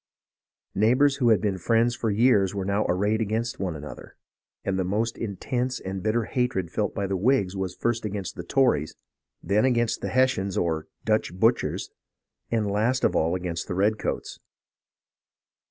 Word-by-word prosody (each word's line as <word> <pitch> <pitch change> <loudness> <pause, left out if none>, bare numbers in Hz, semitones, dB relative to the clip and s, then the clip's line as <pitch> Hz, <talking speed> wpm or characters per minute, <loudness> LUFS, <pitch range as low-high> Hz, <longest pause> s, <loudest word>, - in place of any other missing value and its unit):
Neigh 110 +4 +3
bours 140 0 +3
who 125 -4 +3
had 110 - +5
been 100 -3 -1
friends 115 +5 +2
for 115 - -1
years 105 -3 +3
were 95 -1 -2
now 100 +2 0
arrayed 105 +5 +1
against 115 +4 -2
one 90 -4 -2
another; 75 0 -9 0.5
and 95 -1 0
the - - +1
most 110 +5 -1
intense 120 +4 -3
and 95 0 -5
bitter 110 +3 +1
hatred 110 -8 -1
felt 105 0 -1
by 100 - -1
the 95 0 -1
Whigs 100 -2 +1
was 95 -2 -3
first 120 -1 -1
against 100 -3 -4
the - - -5
Tories, 85 - +1 0.5
then 100 +5 +2
against 120 -3 +1
the - - -2
Hessians 130 -7 +1
or 80 -2 -1
" - - -39
Dutch 110 -4 +1
butchers," 115 +6 +1 0.6
and 115 -2 0
last 110 +6 0
of - - +2
all 80 +3 +2
against 90 -2 -4
the 90 - -3
redcoats. 105 +3 -1
105 Hz, 170 wpm, -26 LUFS, 95-120 Hz, 0.6 s, had